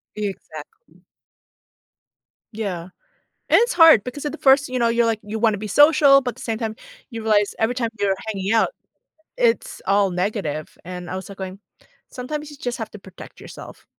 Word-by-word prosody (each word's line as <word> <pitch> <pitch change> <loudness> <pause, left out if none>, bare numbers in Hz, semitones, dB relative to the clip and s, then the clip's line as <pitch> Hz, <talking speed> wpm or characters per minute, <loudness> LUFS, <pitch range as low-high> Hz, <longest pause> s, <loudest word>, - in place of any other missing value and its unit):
Exactly. 200 - -8 1.5
Yeah. 195 -6 -4 0.7
And - - +5
it's 475 +1 +1
hard 325 - +7
because 265 +4 -7
at 295 - -2
the 320 - -8
first 275 +1 +4
you 255 0 -2
know, 235 - +3
you're 235 0 +2
like, 225 -1 0
you 210 +2 -5
wanna 215 -2 +2
be 215 - -6
social, 290 +2 +6
but 250 -2 -4
the - - -12
same 225 -2 -3
time, 220 -1 -3 0.4
you 225 -1 -6
realize 210 -2 +2
every 225 +3 +1
time 235 -2 -1
you're 200 -1 +2
hanging 195 -1 -2
out, 230 - +3 0.7
it's - - 0
all 200 0 +3
negative. 180 -5 -3
And 180 0 -8
I - - -4
was, 190 +1 -7
like, 200 - -10
going, 190 0 -7 0.5
"Sometimes 300 +4 -6
you 295 - -12
just 245 -2 -4
have 220 -1 -5
to 210 - -11
protect 190 -1 -13
yourself." - - -12
220 Hz, 185 wpm, -22 LUFS, 195-260 Hz, 1.5 s, hard